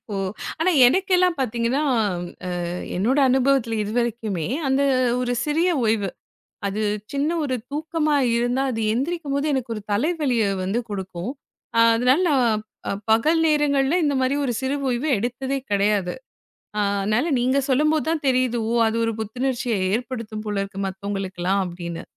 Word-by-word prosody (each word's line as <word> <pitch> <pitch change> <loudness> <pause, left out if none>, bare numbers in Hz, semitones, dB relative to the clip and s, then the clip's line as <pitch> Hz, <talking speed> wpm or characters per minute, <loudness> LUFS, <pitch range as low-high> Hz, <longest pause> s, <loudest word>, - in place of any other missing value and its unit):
ஓ - - -2 0.5
ஆனா 365 +3 +3 0.2
எனக்கெல்லாம் 365 +3 +3
பாத்தீங்கன்னா 240 +2 0 0.7
அ - - -3 0.5
என்னோட 235 +10 +1
அனுபவத்துல 260 -3 +2
இதுவரைக்குமே 220 -6 -2 0.2
அந்த 265 +1 +2 0.4
ஒரு 245 -1 -1
சிறிய 320 +4 +1 0.2
ஓய்வு 215 -3 +1 0.6
அது 205 +2 -2 0.3
சின்ன 285 +2 0
ஒரு 260 -3 -1 0.2
தூக்கமா 305 0 0 0.2
இருந்தா 245 +3 +1
அது 225 - -3
எந்திரிக்கும்போது 285 +1 -1
எனக்கு 255 -3 -2
ஒரு 210 - -6
தலைவலிய 265 -1 +1 0.2
வந்து 200 +6 0
கொடுக்கும். 190 0 -4 0.6
அதனால 250 +7 +3
நான் 235 -6 +2 0.5
பகல் 305 +10 +4
நேரங்கள்ல 295 -1 +2
இந்த 290 -1 +1
மாரி 260 +2 +1
ஒரு 245 - 0
சிறு 265 +1 -1 0.2
ஓய்வு 250 +5 -1
எடுத்ததே 255 +5 -2
கெடையாது. 200 -2 +1 0.7
அதனால 200 +7 +1
நீங்க 260 +3 +2
சொல்லும்போது 305 +3 +2
தான் 320 -3 -2
தெரியுது. 255 -2 +1 0.3
அது 220 - -2
ஒரு 225 - -1
புத்துணர்ச்சிய 240 +1 -1 0.2
ஏற்படுத்தும் 230 -3 -4
போல 205 -1 -1
இருக்கு. 195 0 -8
மத்தவங்களுக்குல்லாம் 195 -1 -2
அப்படின்னு. 170 -1 -6
245 Hz, 130 wpm, -23 LUFS, 210-280 Hz, 0.7 s, பகல்